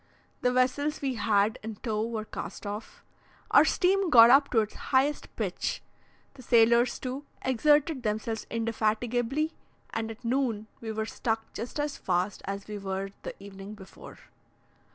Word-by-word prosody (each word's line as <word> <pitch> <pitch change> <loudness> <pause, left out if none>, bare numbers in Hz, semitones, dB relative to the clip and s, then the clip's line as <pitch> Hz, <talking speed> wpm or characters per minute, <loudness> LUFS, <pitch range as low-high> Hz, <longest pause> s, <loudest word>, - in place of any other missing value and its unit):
The 250 - +2
vessels 260 +4 +1
we 270 -2 -1
had 210 -2 +1
in 220 0 -6
tow 215 -1 -2
were 225 -1 -3
cast - - -7
off, 205 +2 -7 0.5
our - - +8
steam 385 0 +2
got 235 -4 +9
up 275 +1 +6
to 225 - +3
its 215 - -4 0.2
highest 275 +2 +1
pitch; - - -3 0.5
the 275 - -13
sailors, 235 0 +4
too, 265 +3 -5 0.2
exerted 295 +3 +3
themselves 220 0 -2
indefatigably, 230 +6 0 0.4
and 225 0 -3
at 225 +1 -10
noon 235 -4 0
we 225 -1 -5
were 220 0 -2
stuck 225 0 -3
just 245 +5 -5
as 290 -1 -2
fast 185 +2 -1
as 200 +1 -5
we 210 -1 -5
were 195 0 -4
the - - -6
evening 200 +1 -10
before. 190 -2 -13
230 Hz, 155 wpm, -28 LUFS, 215-260 Hz, 0.5 s, got